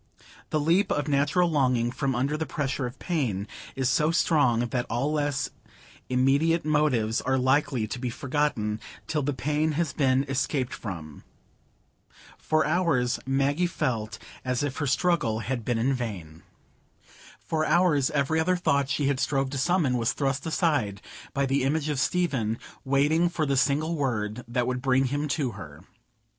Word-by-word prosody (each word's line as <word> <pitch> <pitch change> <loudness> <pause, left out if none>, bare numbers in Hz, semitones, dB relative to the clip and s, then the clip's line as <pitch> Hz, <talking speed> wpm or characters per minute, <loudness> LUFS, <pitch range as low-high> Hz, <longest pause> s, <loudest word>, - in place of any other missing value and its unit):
The 155 - +1
leap 170 +7 +2
of 145 0 0
natural 145 +5 +2
longing 125 -6 +1
from 135 0 -1
under 135 +5 0
the 160 +1 -3
pressure 135 -3 -2
of 125 - -10
pain 120 - -2 0.3
is 130 -1 0
so 150 +5 +2
strong, 145 -9 +3
that 125 -1 -2
all 135 +6 0
less 145 -2 -1 0.6
immediate 140 +6 +2
motives 140 -8 +1
are 130 +1 +1
likely 130 -2 +2
to 120 +4 -5
be 125 0 -2
forgotten—till 140 +1 -2
the 145 +1 0
pain 150 +4 0
has 160 -1 -1
been 135 -2 +2
escaped 135 -1 -1
from. 80 -8 -7 1.2
For 155 -1 +1
hours 150 -7 +1
Maggie 140 +6 +1
felt 115 -10 -2 0.3
as 130 +1 -1
if 145 -1 -3
her 145 - -1
struggle 135 -7 +1
had 120 +1 -3
been 120 +1 0
in 125 +4 +1
vain. 95 -11 -5 1.0
For 155 -1 -2
hours 155 -4 +3
every 150 +2 +1
other 180 +3 +2
thought 140 -6 +1
that - - -1
she 140 -1 +1
strove 135 0 0
to 140 - -3
summon 145 -5 +2
was 115 - +1
thrust 140 +2 -1
aside 145 - 0 0.3
by 140 0 0
the 135 +1 +1
image 150 +3 0
of 145 -3 -1
Stephen 135 -9 0 0.3
waiting 145 +6 +2
for 165 -2 -1
the 140 -1 +1
single 145 +5 +1
word 120 -5 -2
that 120 +1 0
would 125 0 -2
bring 130 0 +3
him 145 +1 -1
to 140 -4 -1
her. 85 -9 -10
140 Hz, 160 wpm, -26 LUFS, 125-150 Hz, 1.2 s, strong